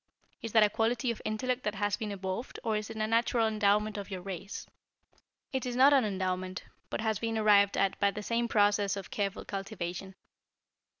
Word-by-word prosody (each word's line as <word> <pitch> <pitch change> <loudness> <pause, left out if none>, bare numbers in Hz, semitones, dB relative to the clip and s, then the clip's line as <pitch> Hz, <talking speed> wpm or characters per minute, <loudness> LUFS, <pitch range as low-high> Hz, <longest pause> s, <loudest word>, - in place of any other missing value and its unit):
Is 225 - -5
that 220 -2 +7
a 210 - +4
quality 235 +3 +1
of 230 - -7
intellect 250 +4 -1
that 210 -2 -2
has 205 0 0
been 210 -1 -4
evolved, 195 +4 -4
or 220 -1 0
is 215 +1 -3
it 225 - -7
a 215 - 0
natural 230 +1 +2
endowment 210 0 +1
of 200 - -7
your 185 -2 -5
race?" 195 +1 -6 0.9
"It 265 - -1
is 250 -2 -3
not 270 +3 +7
an 265 -4 +4
endowment, 185 -2 -2 0.3
but - - -3
has 220 -2 0
been 225 -1 -1
arrived 205 -2 +5
at 195 - +1
by 200 - +4
the 210 +1 -6
same 235 +2 0
process 205 -2 +2
of 195 - -8
careful 200 -2 -2
cultivation. 195 -2 -5
210 Hz, 195 wpm, -30 LUFS, 195-225 Hz, 0.9 s, that